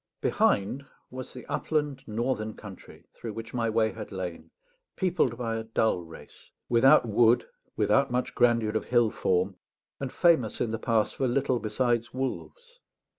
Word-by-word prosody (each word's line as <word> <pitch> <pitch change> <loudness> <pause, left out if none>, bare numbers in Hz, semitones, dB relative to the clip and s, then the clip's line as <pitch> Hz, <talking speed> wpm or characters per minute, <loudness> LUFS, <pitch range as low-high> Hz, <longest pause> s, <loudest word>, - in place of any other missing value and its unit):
Behind 105 +8 +1 0.3
was 130 0 -7
the 125 - -10
upland 145 -3 -2
northern 110 -1 -2
country 100 -4 -12
through 115 -2 -7
which 115 +1 -8
my 115 -2 0
way 110 0 +2
had 110 -1 -8
lain, 90 -3 -6 0.5
peopled 175 - +1
by 115 -2 -2
a 110 - -4
dull 110 -4 0
race, 80 0 -14 0.2
without 120 +1 +5
wood, 115 +2 +4 0.3
without 140 0 +2
much 125 +1 -1
grandeur 115 -3 +3
of 110 - -1
hill 120 -3 +3
form, 95 +1 0 0.4
and 135 -2 -4
famous 160 - +2
in 115 - -1
the 115 - -3
past 110 -2 +1
for 130 - +1
little 130 0 +1
besides 120 +2 -1
wolves. 480 - -5
115 Hz, 155 wpm, -28 LUFS, 110-130 Hz, 0.5 s, without